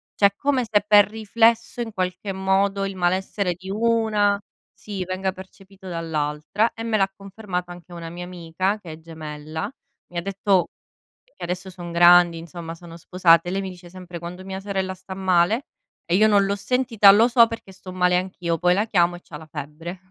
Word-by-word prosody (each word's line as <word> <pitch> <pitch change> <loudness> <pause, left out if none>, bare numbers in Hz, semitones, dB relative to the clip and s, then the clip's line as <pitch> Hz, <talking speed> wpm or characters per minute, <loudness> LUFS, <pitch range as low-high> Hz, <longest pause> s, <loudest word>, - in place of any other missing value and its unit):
Cioè 200 -1 +4
come 270 -1 0
se 210 -2 +2
per 205 -1 +7
riflesso 230 +2 +1
in 225 -2 -5
qualche 185 +1 -3
modo 195 +1 +1
il 195 -1 -5
malessere 185 +1 0
di 185 +2 -11
una, 215 -2 +2 0.3
sì, 200 -3 -6
venga 185 +1 -2
percepito 190 +1 -14
dall'altra 160 +4 -1
e 225 - -7
me 225 -2 0
l'ha 195 -1 +1
confermato 195 -3 -6
anche 175 0 -12
una 170 -1 -7
mia 175 +1 -7
amica, 180 +3 -2
che 170 -5 -9
è 155 - -11
gemella, 160 +3 -7 0.4
mi 175 - -9
ha - - 0
detto 195 0 +1 0.7
e - - -15
adesso 180 +2 -4
son 175 -2 -8
grandi, 175 0 +6
insomma, 165 0 -8
sono 170 -1 -12
sposate 170 -1 +3
e - - -1
lei 195 - -1
mi 190 - -5
dice 175 -1 -13
sempre: 180 -1 -9
"Quando 180 +2 -8
mia 190 0 -6
sorella 190 -1 -3
sta 190 +1 -10
male 190 +6 +2 0.4
e 170 - -1
io 215 +3 +5
non 200 -2 +4
l'ho 200 +1 0
sentita, 230 -2 +4
lo 215 +4 +6
so 235 -1 +6
perché 230 -4 -8
sto 185 0 -11
male 180 -1 +2
anch'io, 180 -2 -2
poi 180 +1 +3
la 205 +4 +1
chiamo 175 -5 +2
e - - -13
c'ha 150 - -11
la 160 +1 -11
febbre". 155 +4 -8
185 Hz, 195 wpm, -23 LUFS, 175-200 Hz, 0.7 s, per